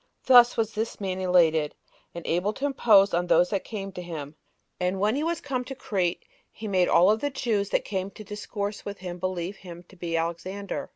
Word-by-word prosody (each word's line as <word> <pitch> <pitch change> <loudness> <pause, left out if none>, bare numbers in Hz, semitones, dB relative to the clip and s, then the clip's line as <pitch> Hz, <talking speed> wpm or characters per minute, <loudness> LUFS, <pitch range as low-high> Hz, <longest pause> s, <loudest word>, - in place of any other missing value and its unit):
Thus 245 -2 +7
was 225 -1 0
this 220 +2 -3
man 190 -2 -3
elated, 165 -4 +3 0.4
and 170 - -7
able 180 +5 0
to 275 - -3
impose 215 -8 +4
on 175 +1 +1
those 175 0 +4
that 200 -2 -1
came 195 -3 -6
to 180 - -7
him; 155 -4 -7 0.4
and 180 +1 -1
when 210 +4 +2
he 290 - -1
was 335 0 -1
come 260 -3 -2
to 270 - -7
Crete, 185 -8 -2 0.3
he 220 - -8
made 185 -3 +2
all 190 +5 +5
the 285 +6 -2
Jews 220 -7 -1
that - - 0
came 190 -1 -3
to 215 - -11
discourse 205 0 -5
with 205 0 -6
him 180 -1 -7
believe 185 +1 -3
him 175 -2 -11
[to - - -16
be 170 -2 -2
Alexander]. 185 +4 -4
195 Hz, 210 wpm, -26 LUFS, 175-215 Hz, 0.4 s, Thus